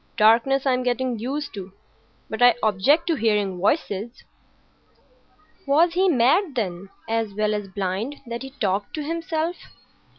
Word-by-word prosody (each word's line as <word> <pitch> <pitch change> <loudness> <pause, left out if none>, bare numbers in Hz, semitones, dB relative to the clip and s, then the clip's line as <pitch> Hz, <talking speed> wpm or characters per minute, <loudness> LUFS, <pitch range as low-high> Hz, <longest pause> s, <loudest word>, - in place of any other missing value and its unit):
Darkness 235 +5 +4
I'm 255 -2 +2
getting 250 -1 -1
used 280 +6 -4
to; 195 -2 -8 0.5
but 220 - -6
I 245 -2 +7
object 220 - +3
to 340 - +1
hearing 210 -5 0
voices." 210 - -1 1.4
Was 325 +5 +4
he 375 +2 +3
mad, 295 - +3
then, 190 -4 -3 0.2
as 225 -3 -2
well 215 0 0
as 205 -1 -3
blind, 195 +7 -3
that 235 0 -5
he 270 - -7
talked 205 -7 -2
to 305 - -3
himself? 330 +1 -2
235 Hz, 140 wpm, -23 LUFS, 210-285 Hz, 1.4 s, I